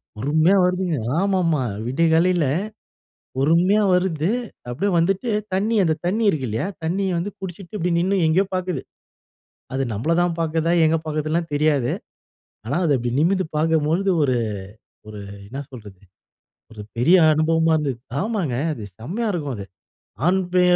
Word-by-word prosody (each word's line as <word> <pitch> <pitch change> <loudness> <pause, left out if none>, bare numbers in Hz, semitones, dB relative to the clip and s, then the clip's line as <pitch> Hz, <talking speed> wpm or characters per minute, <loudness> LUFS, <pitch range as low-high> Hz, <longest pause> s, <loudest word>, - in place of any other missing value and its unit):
பொறுமையா 155 - +3
வருதுங்க! 180 -3 0 0.2
ஆமாமா, 180 -6 +1 0.2
விடியகாலைல, 165 +5 +2 0.9
பொறுமையா 170 +9 +3
வருது 180 -3 +1 0.4
அப்டியே 165 +12 -1
வந்துட்டு 195 +7 +1 0.2
தண்ணி 210 +5 +1
அந்த 160 -3 +2
தண்ணி 210 +6 +1
இருக்கு 145 -8 -1
இல்லையா, 110 - -2 0.2
தண்ணிய 185 +3 0
வந்து 185 +5 -3
குடிச்சுட்டு 190 +1 -8
இப்டி 180 -1 -1
நின்னு, 190 +3 +1
எங்கயோ 180 +5 +3
பாக்குது. 180 -6 -2 0.9
அது 135 - 0
நம்பள 120 +11 -1
தான் 175 -1 0
பாக்குதா? 165 +1 0
எங்க 160 +1 +3
பாக்குதுலாம் 155 +2 -1
தெரியாது. 145 -4 +2 0.8
ஆனா, 135 - -1
அதை 150 -4 +3
அப்டி 120 0 -2
நிமிந்து 185 +3 +2
பாக்கம்பொழுது 160 +4 +1
ஒரு 130 -3 +1 0.7
ஒரு 105 -1 -8 0.3
என்ன 130 +7 -8
சொல்றது? 105 -7 -12 0.7
ஒரு 110 -2 -9 0.2
பெரிய 165 +11 +5 0.2
அனுபவமா 160 +1 +2
இருந்தது. 145 -5 -1 0.2
ஆமாங்க! 200 - -1 0.2
அது 115 - -8
செம்மையா 185 - -3
இருக்கும் 145 -8 -3
அது. 100 - -6 0.6
ஆண் 190 +2 +3
பெ 180 - +4
165 Hz, 135 wpm, -22 LUFS, 145-185 Hz, 0.9 s, பெரிய